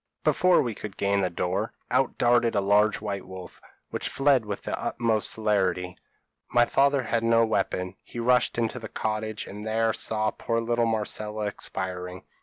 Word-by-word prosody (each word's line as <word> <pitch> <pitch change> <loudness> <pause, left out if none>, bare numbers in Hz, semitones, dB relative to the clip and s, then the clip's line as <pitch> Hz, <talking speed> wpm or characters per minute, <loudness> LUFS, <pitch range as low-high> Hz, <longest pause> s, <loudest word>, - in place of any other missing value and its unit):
Before 180 -3 +4
we 120 -3 -2
could 100 -1 -8
gain 100 0 +1
the 90 - +1
door, 90 +5 -2 0.2
out 130 +1 +1
darted 120 -1 +3
a - - +4
large 105 +2 +3
white 100 -3 -4
wolf, 95 -1 -10 0.3
which - - -3
fled 135 -5 +2
with 100 - -4
the - - -2
utmost 115 -3 0
celerity. 95 -4 0 0.5
My 120 +2 +4
father 140 +1 +2
had 115 0 0
no 115 0 +4
weapon; 95 -3 -1
he - - -11
rushed 125 +1 +2
into 115 +1 -1
the 110 -2 -8
cottage, 110 0 -3
and 105 +1 -8
there 110 +1 +1
saw 110 -1 +1
poor 115 0 -2
little 120 0 +1
Marcella 110 -1 -2
expiring. 95 -2 -5
110 Hz, 170 wpm, -26 LUFS, 100-115 Hz, 0.5 s, Before